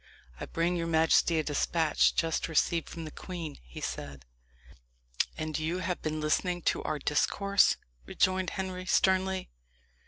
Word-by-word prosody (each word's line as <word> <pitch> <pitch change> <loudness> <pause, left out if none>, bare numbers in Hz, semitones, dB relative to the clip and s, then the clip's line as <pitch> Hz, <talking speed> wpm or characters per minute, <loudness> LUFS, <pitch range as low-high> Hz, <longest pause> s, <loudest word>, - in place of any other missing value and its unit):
"I - - -5
bring 170 +2 0
your 165 -1 -2
majesty 165 +1 +3
a 155 - +1
despatch, 155 +2 +2
just 165 -1 0
received 165 +1 +1
from 165 -1 -7
the 155 - -7
queen," 170 -5 -7
he - - -10
said. 70 -3 -5 1.1
"And 155 -1 -3
you 160 +3 -1
have 180 -1 -3
been 155 0 -2
listening 175 +3 0
to - - -5
our 155 - -2
discourse?" 200 +8 +2 0.3
rejoined 185 0 +1
Henry 185 -1 -5
sternly. 190 0 +2
165 Hz, 145 wpm, -30 LUFS, 155-185 Hz, 1.1 s, majesty